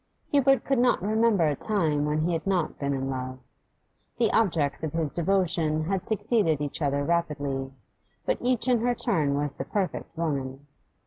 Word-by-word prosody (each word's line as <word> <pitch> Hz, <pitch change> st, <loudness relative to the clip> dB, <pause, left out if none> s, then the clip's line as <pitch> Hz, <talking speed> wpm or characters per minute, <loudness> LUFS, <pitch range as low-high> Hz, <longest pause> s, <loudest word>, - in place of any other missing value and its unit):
Hubert 270 Hz, -3 st, +4 dB
could 270 Hz, -3 st, +1 dB
not 245 Hz, 0 st, +3 dB
remember 215 Hz, -3 st, +3 dB
a 145 Hz, -, 0 dB
time 155 Hz, -7 st, 0 dB
when 150 Hz, +1 st, 0 dB
he 170 Hz, +2 st, 0 dB
had 165 Hz, +3 st, -3 dB
not 180 Hz, -5 st, 0 dB
been 140 Hz, -1 st, -1 dB
in 135 Hz, -1 st, -2 dB
love. 130 Hz, -1 st, -4 dB, 0.8 s
The 230 Hz, -2 st, +2 dB
objects 160 Hz, -10 st, +2 dB
of 155 Hz, -, -3 dB
his 160 Hz, -3 st, -1 dB
devotion 170 Hz, -3 st, +1 dB
had 185 Hz, +2 st, -2 dB
succeeded 210 Hz, -, +1 dB
each 145 Hz, +2 st, -4 dB
other 140 Hz, -1 st, +1 dB
rapidly, 145 Hz, -5 st, -1 dB, 0.5 s
but -, -, 0 dB
each 250 Hz, 0 st, +1 dB
in 245 Hz, -2 st, +3 dB
her 245 Hz, +2 st, +1 dB
turn 150 Hz, -10 st, +1 dB
was 145 Hz, 0 st, 0 dB
the -, -, -5 dB
perfect 190 Hz, -4 st, -3 dB
woman. 140 Hz, -4 st, -3 dB
165 Hz, 175 wpm, -27 LUFS, 145-210 Hz, 0.8 s, Hubert